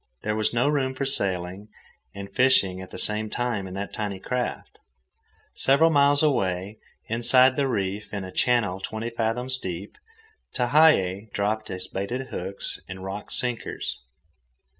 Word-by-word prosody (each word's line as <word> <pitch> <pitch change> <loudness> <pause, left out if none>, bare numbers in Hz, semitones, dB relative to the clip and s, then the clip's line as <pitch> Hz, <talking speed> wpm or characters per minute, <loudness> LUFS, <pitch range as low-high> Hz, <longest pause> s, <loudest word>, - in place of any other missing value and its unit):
There 105 0 -1
was 110 0 +2
no 120 +3 +1
room 135 -3 0
for 140 - -2
sailing 95 -5 0 0.5
and 100 0 -8
fishing 125 -8 +3
at 95 - -9
the - - -9
same 110 0 0
time 120 -6 -2
in 95 - -8
that 100 +1 -5
tiny 100 -3 -4
craft. 125 +5 -4 0.7
Several 150 +5 +4
miles 145 0 +5
away, 100 -7 0 0.3
inside 125 +3 +5
the 140 0 +1
reef, 100 -3 -2
in 100 -2 -4
a 95 - -7
channel 105 -7 +1
twenty 110 +4 -4
fathoms 125 +3 0
deep, 95 0 -6 0.6
Tehei 120 - +3
dropped 110 +2 -1
his 95 0 -6
baited 120 +9 -4
hooks 95 +2 -5
and 95 0 -7
rock 95 +2 -6
sinkers. 125 -2 -3
110 Hz, 145 wpm, -25 LUFS, 95-130 Hz, 0.7 s, miles